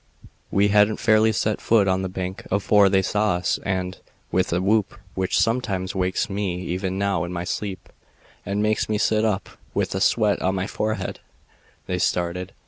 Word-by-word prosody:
We 100 +1 +3
hadn't 105 +1 +4
fairly 110 0 +4
set 110 0 -1
foot 110 -4 +3
on 95 0 +1
the 95 - -3
bank 95 +1 -5
afore 100 0 +4
they 95 0 +3
saw 105 0 +1
us 90 - 0
and, 95 -1 -2 0.3
with 95 +1 +1
a 85 - +1
whoop 105 +5 +1 0.2
which 95 -1 0
sometimes 100 -3 0
wakes 95 +3 0
me 95 -3 -2
even 95 +1 -3
now 100 -3 0
in 85 - -5
my 85 -1 -3
sleep 95 +1 -4 0.6
and 100 +1 -1
makes 110 0 +1
me 105 - +1
sit 110 +1 +2
up 105 -3 0 0.3
with - - 0
the 95 - -2
sweat 105 +1 +2
on 95 +1 +1
my 95 0 -1
forehead 110 +2 -3 0.7
they 90 -1 -2
started. 90 +2 -1
95 Hz, 180 wpm, -23 LUFS, 95-105 Hz, 0.7 s, hadn't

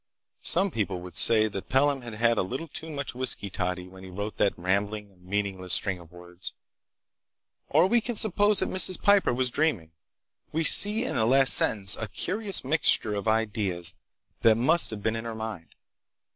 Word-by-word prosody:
Some 190 +3 +2
people 100 - -3
would 90 0 -12
say 110 -1 +5
that 100 -2 -8
Pelham 135 +1 +1
had 120 -3 -9
had 115 0 +1
a - - +2
little 130 - -6
too 160 +1 -8
much 140 -3 -6
whisky 125 -5 -2
toddy 90 -1 -4
when 95 0 -15
he 95 - -11
wrote 100 +3 -7
that 100 - 0
rambling, 100 +3 -3
meaningless 95 -1 -3
string 95 -2 -2
of 85 -2 -17
words. 90 0 -10 1.2
Or 160 +4 +3
we 235 +5 +1
can 240 +1 -5
suppose 205 0 +3
that 190 - -2
Mrs. 185 -1 +2
Piper 200 -1 +2
was 125 0 -1
dreaming. 115 - -2 0.6
We 160 +1 -2
see 210 - +6
in - - -3
the 110 - +1
last 135 +1 +6
sentence 100 -2 +4
a 110 - -6
curious 195 - -2
mixture 130 -6 0
of 100 +1 -5
ideas 105 -6 -2 0.5
that 110 -1 +4
must 160 +8 +3
have 105 -2 -8
been 110 0 -1
in 115 0 -6
her 115 -1 -6
mind. 110 -7 -8
110 Hz, 185 wpm, -25 LUFS, 95-150 Hz, 1.2 s, see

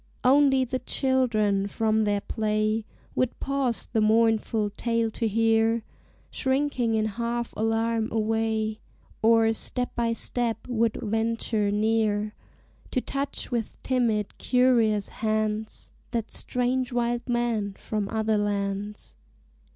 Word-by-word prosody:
Only 270 0 +5
the 255 +1 -2
children 230 -7 +1
from 220 +1 +1
their 205 -1 +1
play 215 0 -1 0.3
Would 255 -1 -1
pause 275 -4 -1
the 220 - 0
mournful 220 -1 +2
tale 230 +1 0
to 225 +1 -1
hear, 225 +1 +2 0.5
Shrinking 265 -4 0
in 215 0 +1
half 235 +2 -3
alarm 225 0 0
away, 220 0 0 0.4
Or, 225 0 +4
step 250 +2 -3
by 235 -1 +1
step, 230 -1 -2
would 230 -2 +1
venture 225 -1 0
near 210 0 +1 0.6
To 255 - 0
touch 275 +2 -2
with 235 -3 -2
timid 230 -5 0
curious 235 -5 +3
hands 215 0 -2 0.2
That 230 -2 -3
strange 250 +1 -1
wild 240 0 -1
man 230 -5 0
from 210 -2 -3
other 220 -1 +1
lands. 205 0 -3
225 Hz, 115 wpm, -26 LUFS, 215-240 Hz, 0.6 s, Only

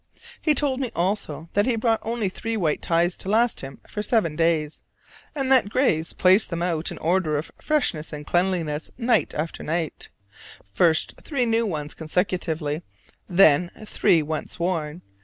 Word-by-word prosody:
He 305 -2 +2
told 275 -2 +1
me 255 -4 -2
also 170 -4 -2
that 205 +3 +2
he 245 - +2
brought 225 0 +1
only 225 -2 -2
three 225 +4 -3
white 160 -7 0
ties 170 +1 +1
to 190 - -5
last 230 +3 +2
him 135 0 -9
for 210 - -4
seven 210 -8 +1
days: 160 -2 0 0.6
and 270 -2 -1
that 255 -6 +5
Graves 180 - +2
placed 190 +4 +4
them 170 0 -2
out 170 -2 -1
in - - -7
order 165 -2 +1
of 150 - -5
freshness 250 - 0
and 150 -1 -7
cleanliness 175 -4 0
night 245 0 +1
after 155 +2 -3
night: 160 -1 -3 0.6
first 160 - +2
three 275 -5 0
new 230 0 +1
ones 150 -5 -4
consecutively, 160 -2 -2 0.5
then 175 -2 +5 0.2
three 185 -6 +2
once 155 +1 -4
worn. 170 -2 -2
175 Hz, 160 wpm, -24 LUFS, 155-225 Hz, 0.6 s, that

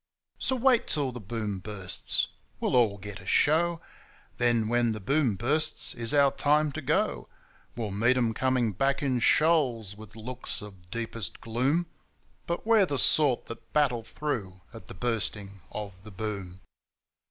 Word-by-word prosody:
So 260 - +1
wait 255 -1 +3
till 145 -4 +1
the 125 - -7
Boom 105 -2 -4
bursts! 95 -2 -2 0.3
we'll - - 0
all 115 -5 +4
get 100 -1 -8
a 95 - -13
show: 165 +6 +3 0.6
Then 120 -2 +3
when 120 0 +2
the 110 - -5
Boom 135 +1 +1
bursts 145 +10 0
is 115 -1 -3
our 140 -2 +5
time 150 +1 +2
to 155 - -5
go. - - 0 0.5
We'll 110 -3 -3
meet 120 +6 +3
'em 115 -3 +2
coming 125 -2 +1
back 135 +9 0
in 130 -3 +1
shoals, 125 - +3
with 110 -1 -13
looks 125 +3 -6
of 95 -4 -13
deepest 115 -2 -5
gloom, 130 +9 +1 0.6
But 170 +4 -2
we're 220 -4 +5
the 140 - -1
sort 140 -2 +3
that 115 - -10
battle 130 -6 +2
through 105 -11 -4
at 115 -5 -11
the - - -9
Bursting 105 -2 -2
of 105 -2 -5
the 110 - -10
Boom. 95 -3 -5
120 Hz, 160 wpm, -28 LUFS, 105-140 Hz, 0.6 s, our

